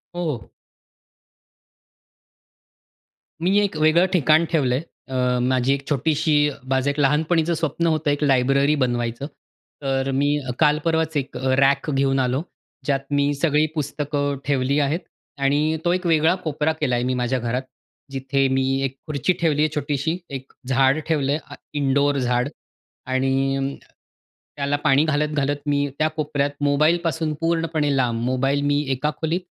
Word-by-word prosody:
हो. 150 Hz, -, -3 dB, 2.9 s
मी 195 Hz, +3 st, +3 dB
एक 200 Hz, -5 st, 0 dB
वेगळं 155 Hz, +4 st, +4 dB
ठिकाण 160 Hz, 0 st, +4 dB
ठेवलं 135 Hz, -6 st, +2 dB
आहे. 145 Hz, -, -2 dB, 0.3 s
अ, 125 Hz, -1 st, +1 dB
माझी 130 Hz, +1 st, +2 dB
एक 140 Hz, 0 st, -5 dB
छोटीशी 155 Hz, +2 st, +1 dB, 0.4 s
माझं 135 Hz, +1 st, +1 dB
एक 140 Hz, +1 st, -2 dB
लहानपणीचं 160 Hz, +4 st, +2 dB
स्वप्न 165 Hz, +1 st, -1 dB
होतं 155 Hz, -2 st, +1 dB
एक 145 Hz, +1 st, -1 dB
लायब्ररी 140 Hz, +2 st, +3 dB
बनवायचं. 120 Hz, -2 st, -1 dB, 0.6 s
तर 135 Hz, 0 st, -1 dB
मी 145 Hz, +2 st, +1 dB, 0.2 s
काल 150 Hz, -1 st, +4 dB
परवाच 160 Hz, -1 st, +1 dB
एक 135 Hz, -1 st, -4 dB, 0.2 s
रॅक 140 Hz, +2 st, +3 dB
घेऊन 135 Hz, 0 st, +1 dB
आलो. 130 Hz, +3 st, 0 dB, 0.4 s
ज्यात 140 Hz, -2 st, +1 dB
मी 145 Hz, 0 st, +2 dB
सगळी 150 Hz, +1 st, +2 dB
पुस्तकं 145 Hz, -1 st, -2 dB
ठेवली 140 Hz, +1 st, +1 dB
आहेत 145 Hz, +4 st, +1 dB, 0.4 s
आणि 150 Hz, +3 st, +2 dB
तो 175 Hz, -, +3 dB
एक 185 Hz, 0 st, -2 dB
वेगळा 160 Hz, +1 st, +4 dB
कोपरा 155 Hz, 0 st, 0 dB
केला 125 Hz, -4 st, +1 dB
आहे 120 Hz, -, 0 dB
मी 130 Hz, +1 st, 0 dB
माझ्या 125 Hz, +1 st, 0 dB
घरात. 120 Hz, +2 st, -2 dB, 0.5 s
जिथे 135 Hz, 0 st, 0 dB
मी 130 Hz, 0 st, +1 dB, 0.2 s
एक 135 Hz, 0 st, -2 dB
खुर्ची 150 Hz, +4 st, 0 dB
ठेवली 150 Hz, -3 st, +2 dB
आहे 155 Hz, -, +3 dB
छोटीशी, 145 Hz, +3 st, -1 dB
एक 135 Hz, -1 st, -7 dB, 0.2 s
झाड 135 Hz, +2 st, +3 dB
ठेवलं 145 Hz, -4 st, +1 dB
आहे 150 Hz, -, 0 dB
अ, -, -, -7 dB, 0.2 s
इनडोअर 140 Hz, 0 st, +1 dB
झाड 125 Hz, +1 st, 0 dB, 0.6 s
आणि 135 Hz, +1 st, +1 dB
अं, 135 Hz, +1 st, -2 dB, 0.8 s
त्याला 140 Hz, 0 st, 0 dB
पाणी 145 Hz, 0 st, +4 dB
घालत-घालत 145 Hz, -2 st, 0 dB
मी 145 Hz, 0 st, +1 dB
त्या 155 Hz, -, +3 dB
कोपऱ्यात 150 Hz, -2 st, -1 dB
मोबाईलपासून 155 Hz, +2 st, +1 dB
पूर्णपणे 165 Hz, -3 st, 0 dB
लांब. 120 Hz, -3 st, 0 dB
मोबाईल 135 Hz, +3 st, +1 dB
मी 145 Hz, +1 st, +2 dB
एका 135 Hz, +3 st, 0 dB
खोलीत 165 Hz, +3 st, 0 dB
145 Hz, 145 wpm, -22 LUFS, 135-155 Hz, 2.9 s, वेगळं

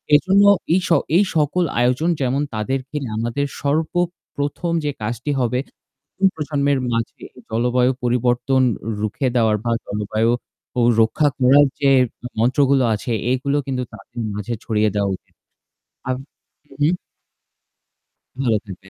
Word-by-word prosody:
এজন্য 195 Hz, +6 st, +4 dB, 0.3 s
এই 185 Hz, -, +4 dB
স -, -, -4 dB, 0.3 s
এই 205 Hz, -, +5 dB
সকল 155 Hz, +4 st, +2 dB, 0.2 s
আয়োজন 125 Hz, +7 st, +2 dB
যেমন 135 Hz, +2 st, +1 dB
তাদেরকে 130 Hz, +6 st, -3 dB
নিয়ে 110 Hz, -4 st, -5 dB
আমাদের 120 Hz, +5 st, -1 dB, 0.2 s
সর্বপ্রথম 160 Hz, +1 st, -2 dB
যে 145 Hz, -, +1 dB
কাজটি 120 Hz, +6 st, -3 dB
হবে 125 Hz, 0 st, +1 dB, 0.6 s
এই 195 Hz, -, +6 dB
প্রজন্মের 145 Hz, -3 st, 0 dB
মাঝে 115 Hz, -1 st, -3 dB, 0.3 s
জলবায়ু 125 Hz, +3 st, +2 dB
পরিবর্তন 125 Hz, +2 st, +2 dB, 0.4 s
রুখে 110 Hz, +5 st, -1 dB
দেওয়ার 110 Hz, -3 st, +3 dB
বা 120 Hz, -, 0 dB, 0.2 s
জলবায়ু 110 Hz, +2 st, 0 dB, 0.5 s
অ -, -, +4 dB, 0.2 s
রক্ষা 145 Hz, +7 st, +3 dB
করার 135 Hz, +3 st, +6 dB
যে 140 Hz, -1 st, +4 dB, 0.5 s
মন্ত্রগুলো 130 Hz, +2 st, +3 dB
আছে 115 Hz, +3 st, -3 dB, 0.2 s
এগুলো 140 Hz, +2 st, 0 dB
কিন্তু 130 Hz, -2 st, -2 dB
তাদের 115 Hz, +3 st, -10 dB
মাঝে 105 Hz, +3 st, -3 dB
ছড়িয়ে 110 Hz, -2 st, +1 dB
দেওয়া 100 Hz, -1 st, +1 dB
উচিত। -, -, -37 dB, 0.7 s
আব 130 Hz, -, 0 dB, 0.6 s
উহু। 145 Hz, +2 st, +2 dB, 1.6 s
ভালো 115 Hz, -4 st, +3 dB
থাকবেন। 95 Hz, -1 st, -11 dB
125 Hz, 125 wpm, -21 LUFS, 115-145 Hz, 1.6 s, এই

